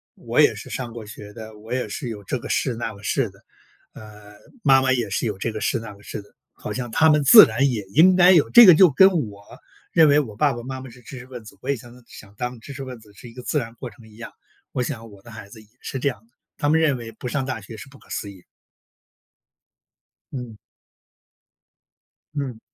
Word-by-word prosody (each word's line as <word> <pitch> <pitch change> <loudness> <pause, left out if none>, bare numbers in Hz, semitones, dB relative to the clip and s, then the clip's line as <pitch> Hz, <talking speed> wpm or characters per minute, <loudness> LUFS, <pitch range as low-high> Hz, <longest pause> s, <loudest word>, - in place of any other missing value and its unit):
我 - - 0
也 - - +4
是 - - -10
上 125 -3 -5
过 115 -1 -9
学 105 -1 -11
的， 110 -1 -11
我 110 +2 -13
也 130 0 -2
是 125 - -6
有 105 -3 -8
这 125 +6 -3
个 - - -9
士 115 +3 0
那 115 0 -4
个 100 - -16
士 120 +3 -1
的， 100 +1 -21 0.5
呃， 105 -1 -14 0.3
妈 135 -2 +5
妈 130 0 +1
也 120 -5 -1
是 100 - -1
有 105 -3 -4
这 115 +4 -3
个 110 - -7
士 - - 0
那 110 -2 -9
个 100 - -19
士 105 - -7
的， 100 - -25 0.2
好 105 - -7
像 120 +2 -5
他 160 +7 +3
们 150 -1 +3
自 215 - +10
然 135 +3 0
也 115 -5 -3
应 180 +5 +6
该 180 0 +6
有。 170 -6 +4
这 240 -1 +9
个 180 - +9
就 180 +3 +6
跟 190 +8 +6 0.2
我 100 0 -15 0.5
认 160 -2 +5
为 145 +1 +5
我 115 -8 -5
爸 140 +5 +1
爸 120 0 -8
妈 130 +1 -7
妈 130 - -10
是 125 +1 -16
知 125 +3 -10
识 125 - -12
分 125 -3 -10
子， - - -13
我 130 - -7
也 140 - +2
想 120 0 -13
能 125 0 -18
想 100 -1 -14
当 125 +2 -5
知 140 +5 -11
识 140 0 -7
分 130 -2 -9
子 105 -2 -20
是 120 +4 -13
一 - - -16
个 125 +1 -10
自 150 - -1
然 115 -3 -7
过 120 0 -8
程 110 +2 -18
一 105 - -18
样。 120 - -10 0.4
我 - - -2
想 115 -4 -5
我 100 -1 -16
的 120 - -15
孩 110 -3 -11
子 110 +1 -14
也 110 - -22
是 135 - -5
这 140 - +1
样 120 - -8
的， 120 - -39 0.2
他 145 - -1
们 160 +2 +3
认 145 -5 +2
为 115 -1 -9
不 120 - -8
上 135 0 -2
大 130 -4 -5
学 110 +3 -11
是 110 - -11
不 140 - -17
可 - - -23
思 100 - -5
议。 95 -3 -17 1.9
嗯。 125 -5 -7 1.8
嗯。 135 -6 -4
120 Hz, 270 characters per minute, -22 LUFS, 110-135 Hz, 1.9 s, 自